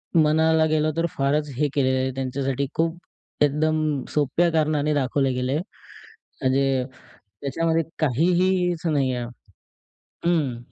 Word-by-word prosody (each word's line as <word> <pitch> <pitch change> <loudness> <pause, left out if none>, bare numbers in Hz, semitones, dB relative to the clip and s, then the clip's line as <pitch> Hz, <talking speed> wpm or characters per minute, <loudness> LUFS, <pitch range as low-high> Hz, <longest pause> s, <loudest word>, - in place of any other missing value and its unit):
म्हणायला 160 0 +4
गेलो, 155 0 +1
तर 165 - +2
फारच 145 +1 0
हे 150 +3 +1
केलेलं 130 -2 +2
आहे, 130 0 -1
त्यांच्यासाठी 135 +1 -2
खूप 165 +1 0 0.5
एकदम 150 -1 +1
सोप्या 150 +4 +2
कारणाने 155 -1 +1
दाखवले 135 -1 +1
गेलय, 125 +3 -1 0.8
म्हणजे 135 -1 +2 0.6
त्याच्यामध्ये 165 +4 0 0.2
काहीहीच 175 +4 +1
नाही 140 -5 +1
आहे. 120 - -3 1.0
हम्म. 155 -8 +1
150 Hz, 110 wpm, -24 LUFS, 135-160 Hz, 1.0 s, म्हणायला